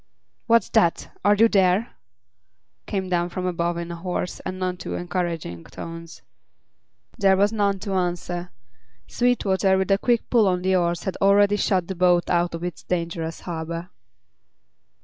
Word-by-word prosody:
"What's 230 -3 +4
that? 170 -1 +1
Are 205 0 +5
you 225 +2 +6
there?" 195 +2 +2 0.9
came 190 -3 -2
down 175 -1 0
from 180 +1 -4
above 170 -1 -1
in 170 0 -5
hoarse 180 +1 -4
and 185 - -6
none 185 -1 -2
too - - -5
encouraging 170 - -3
tones. 165 0 -9 1.0
There 195 -1 +4
was 205 +3 +2
none 200 -2 +1
to 200 -2 -3
answer; 175 -1 -2 0.6
Sweetwater, 195 -6 +1
with 190 +1 0
a 195 - +4
quick 240 0 +1
pull 230 -4 +5
on 180 -1 0
the 190 0 +2
oars, 175 -1 0
had 190 - -3
already 200 +1 +4
shot 185 -3 +1
the 190 - -4
boat 175 -1 +2
out 175 -1 +1
of 165 - -7
its 180 -2 -5
dangerous 170 -2 -3
harbor. 170 0 -5
180 Hz, 155 wpm, -23 LUFS, 170-195 Hz, 1.0 s, you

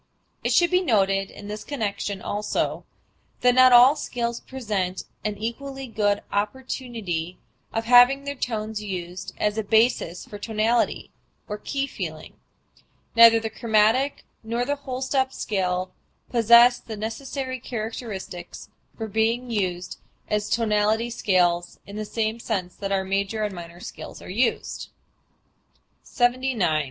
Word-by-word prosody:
It - - 0
should 345 0 +4
be 365 0 +4
noted 195 - +2
in 205 - -11
this 210 0 -6
connection 205 -7 -3
also 210 +1 -2 0.6
that 250 0 +5
not 255 0 +7
all 250 +4 +8
scales 235 -5 -3
present 205 -8 -3 0.2
an 210 -1 -2
equally 270 +5 -5
good 205 -4 0
opportunity 205 -6 -3 0.3
of 225 0 -2
having 245 +3 +6
their 280 0 -3
tones 220 -5 -3
used 185 -2 -6
as 210 +1 0
a - - -1
basis 220 -5 +2
for 205 - -9
tonality 225 +2 0 0.4
or 210 -1 -5
key 275 +5 -2
feeling: - - -7 0.8
neither 230 0 +8
the 220 -1 -4
chromatic 225 +5 +2 0.2
nor 235 +2 -2
the 285 +2 0
whole 265 -2 -5
step 265 0 +1
scale 185 -5 -2 0.4
possess 235 +1 +6
the 220 -2 -8
necessary 260 +4 -4
characteristics 215 -6 -6 0.3
for 225 - -4
being 225 +3 0
used 180 -4 -2 0.3
as 210 0 0
tonality 220 +1 +1
scales 175 -5 +1
in 200 - -10
the 215 0 -3
same 220 +1 -2
sense 190 -6 -3
that 195 +1 -5
our 195 -1 +1
major 200 +3 -1
and 210 -2 -2
minor 170 -1 -9
scales - - -9
are - - -12
so - - -10
used. 240 +1 -1 1.1
79. 245 - +1
220 Hz, 140 wpm, -24 LUFS, 200-245 Hz, 1.1 s, all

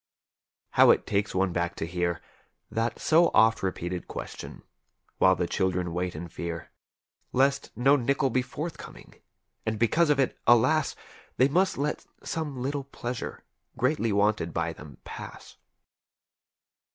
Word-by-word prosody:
How - - +6
it - - +4
takes 100 -1 -1
one 95 -1 +1
back 85 0 -1
to - - -3
hear 85 0 -2 0.5
That 115 +1 -1
so 165 +2 +4
oft 115 0 +5
repeated 90 -1 -3
question, - - -8 0.6
while 95 0 +6
the 90 - -1
children 90 -1 -1
wait 90 0 -2
in 85 +3 -6
fear 85 0 -6 0.6
Lest 135 +2 +2
no 135 +4 +5
nickel 135 0 +1
be 130 - +2
forthcoming, 150 +6 -7 0.5
and 110 -1 -2
because 150 +9 +3
of 145 -2 +3
it, 135 - 0
alas. 130 +6 +4 0.4
They 130 +2 +5
must 185 +6 +2
let 145 +2 -2 0.2
some 150 -5 -4
little 140 +1 -2
pleasure 125 -3 -6 0.3
greatly 125 -3 +1
wanted 100 -4 +1
by - - -1
them 75 -4 -12
pass. - - -10
115 Hz, 140 wpm, -27 LUFS, 90-140 Hz, 0.6 s, How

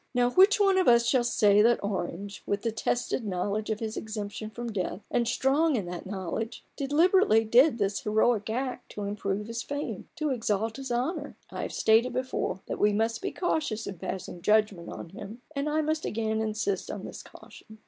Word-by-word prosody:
Now, 245 0 +3
which 390 +7 +6
one 390 -2 +4
of 370 - +2
us 235 -1 +6
shall 250 0 +3
say 210 -3 +4
that 235 0 +3
Orange, 200 0 -4
with 200 0 -1
the 230 - 0
tested 235 +2 -1
knowledge 205 +2 -2
of 215 -1 -1
his 220 -1 -4
exemption 215 0 -5
from 235 +1 -6
death, 195 -1 -3
and 235 -1 +1
strong 275 +6 +2
in 210 -6 -1
that 175 +1 -6
knowledge, 195 +4 -4
deliberately 290 - +4
did 240 +5 +5
this 200 -2 0
heroic 220 0 +1
act 255 +3 -3
to 210 - -5
improve 200 0 -2
his 230 +1 -4
fame, 285 +3 -5
to 310 -3 -1
exalt 225 -2 -1
his 270 -2 -6
honour? 285 +5 -2
I - - -4
have - - -4
stated 225 +3 +3
before 255 -7 -2
that - - -5
we 210 0 +4
must 225 - 0
be 390 - -2
cautious 300 - -1
in 190 -4 -7
passing 180 -1 -5
judgment 210 -4 +2
on - - -8
him, 210 +6 -10
and 280 +2 -1
I 310 +1 +1
must 310 +1 -1
again 220 0 -1
insist 215 -3 -2
on - - -5
this - - -8
caution. 220 -1 -15
225 Hz, 195 wpm, -28 LUFS, 205-260 Hz, -, which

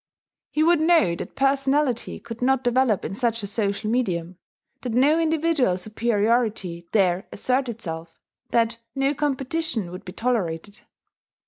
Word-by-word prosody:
He 305 - +1
would 335 -1 +4
know 320 - +4
that - - -7
personality 275 -2 +1
could 230 0 -9
not 265 +1 +2
develop 245 -4 +2
in - - -4
such 230 0 -1
a - - -1
social 200 0 -2
medium, 185 -7 -1 0.4
that 245 -3 -4
no 285 +7 +4
individual 315 - +2
superiority 215 -3 0
dare 190 -3 +2
assert 255 +4 0
itself, 165 -8 -6 0.3
that 230 0 +1 0.2
no 270 +1 +1
competition 280 - -1
would 180 - -8
be 180 - -9
tolerated. 205 -5 -2
235 Hz, 135 wpm, -24 LUFS, 200-270 Hz, 0.4 s, would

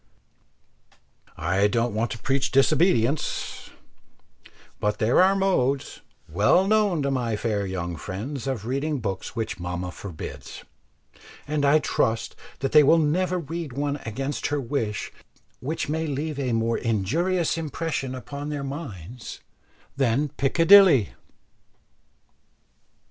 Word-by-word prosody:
I 90 +4 +2
don't 115 +2 0
want 110 +2 0
to - - -5
preach 135 +3 0
disobedience; 140 -1 +1 1.1
but 105 0 0
there 115 +9 +3
are 190 +1 +5
modes 140 -9 0 0.3
well 105 - +3
known 205 -7 +2
to 140 - 0
my 120 -4 -1
fair 105 -2 -1
young 85 -2 -4
friends 110 - -5
of 125 -6 -3
reading 140 +4 -1
books 100 -1 -4
which 110 -4 -3
mamma 90 +1 -4
forbids, 90 -3 -8 0.8
and 150 0 -1
I 145 +2 +5
trust 115 -6 0 0.3
that 135 - -1
they 150 - +8
will 150 +3 +5
never 180 +4 +1
read 165 -3 -5
one 145 +2 -1
against 135 +4 -3
her 145 0 -1
wish 115 -6 -3 0.5
which 150 +6 -3
may 160 +2 -1
leave 145 +1 -3
a 130 -3 -1
more 115 0 0
injurious 160 - 0
impression 155 -4 -3
upon 140 +3 -6
their 145 -2 -3
minds 125 - -7 0.5
than 135 +2 +1
'Piccadilly.' 165 - +6
135 Hz, 120 wpm, -25 LUFS, 110-155 Hz, 1.1 s, they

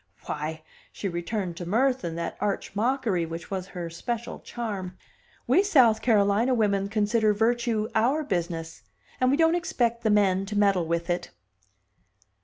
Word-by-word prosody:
Why" 155 +1 -4 0.3
she 200 - -4
returned 175 0 -3
to 175 - -5
mirth 255 +6 +2
and 165 -1 -4
that 170 0 -3
arch 205 -1 -2
mockery 225 -5 +1
which 165 +2 -7
was 190 -1 -3
her 175 -3 -6
special 235 +7 -4
charm 195 -6 -5 0.5
"we - - +4
South 255 - +4
Carolina 215 +2 +3
women 200 -3 +1
consider 215 0 +2
virtue 225 0 +1
our 260 +8 +2
business, 170 - -3 0.4
and 255 - +3
we 280 - +3
don't 325 0 +4
expect 240 -9 0
the 220 - +1
men 195 -2 +3
to 210 +1 -3
meddle 195 -5 +3
with 170 +1 -1
it!" 175 - -2
210 Hz, 155 wpm, -26 LUFS, 180-235 Hz, 0.5 s, we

